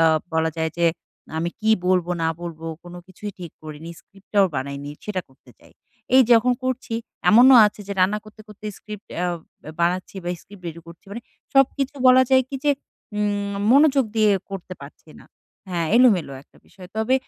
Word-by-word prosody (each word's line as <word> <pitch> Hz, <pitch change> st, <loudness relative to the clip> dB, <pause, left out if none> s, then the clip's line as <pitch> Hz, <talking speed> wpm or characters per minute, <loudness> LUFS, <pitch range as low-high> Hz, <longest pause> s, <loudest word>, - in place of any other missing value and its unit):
আ -, -, +5 dB, 0.3 s
বলা 160 Hz, 0 st, +1 dB
যায় 160 Hz, 0 st, -1 dB
যে 170 Hz, -, +3 dB, 0.5 s
আমি 170 Hz, +2 st, -1 dB
কি 220 Hz, +1 st, +1 dB, 0.2 s
বলবো, 180 Hz, -1 st, +2 dB
না 160 Hz, -, +2 dB
বলবো, 165 Hz, -1 st, -7 dB, 0.2 s
কোনো 175 Hz, 0 st, -10 dB
কিছুই 205 Hz, +2 st, -8 dB
ঠিক 175 Hz, -3 st, -8 dB
করিনি, 155 Hz, +2 st, -9 dB
স্ক্রিপ্টটাও 195 Hz, 0 st, 0 dB
বানাইনি।" 140 Hz, +2 st, -5 dB
সেটা 200 Hz, -3 st, -2 dB
করতে 130 Hz, -, -22 dB
চাই। -, -, -21 dB, 0.4 s
এই 265 Hz, -, +8 dB
যখন 235 Hz, +2 st, +5 dB
করছি 255 Hz, -2 st, -3 dB, 0.4 s
এমনও 250 Hz, +4 st, +8 dB
আছে 210 Hz, 0 st, -5 dB
যে 200 Hz, -, -2 dB
রান্না 200 Hz, +3 st, +2 dB
করতে, 215 Hz, 0 st, -15 dB
করতে 210 Hz, 0 st, -15 dB
স্ক্রিপ্ট 210 Hz, -1 st, -10 dB
অ্যা 180 Hz, -, -1 dB, 0.5 s
বানাচ্ছি 180 Hz, +3 st, -1 dB
বা -, -, -3 dB
স্ক্রিপ্ট 200 Hz, -2 st, -16 dB
রেডি 165 Hz, +1 st, -9 dB
করছি। 170 Hz, +3 st, -14 dB
মানে 235 Hz, +3 st, -7 dB, 0.3 s
সবকিছু 270 Hz, +1 st, +2 dB
বলা 255 Hz, 0 st, +7 dB
যায় 260 Hz, 0 st, +5 dB
কি 275 Hz, -, -3 dB
যে 290 Hz, -, +4 dB, 0.5 s
উম 205 Hz, -1 st, -1 dB, 0.2 s
মনোযোগ 275 Hz, 0 st, +5 dB
দিয়ে 215 Hz, -2 st, +4 dB, 0.2 s
করতে 185 Hz, -1 st, -7 dB
পারছি 150 Hz, +2 st, -14 dB
না। -, -, -17 dB, 0.4 s
হ্যাঁ, 170 Hz, -2 st, -1 dB
এলোমেলো 210 Hz, -, +4 dB
একটা -, -, -28 dB
বিষয়। 185 Hz, -2 st, -14 dB
তবে 220 Hz, +4 st, +1 dB
200 Hz, 175 wpm, -22 LUFS, 170-230 Hz, 0.5 s, এই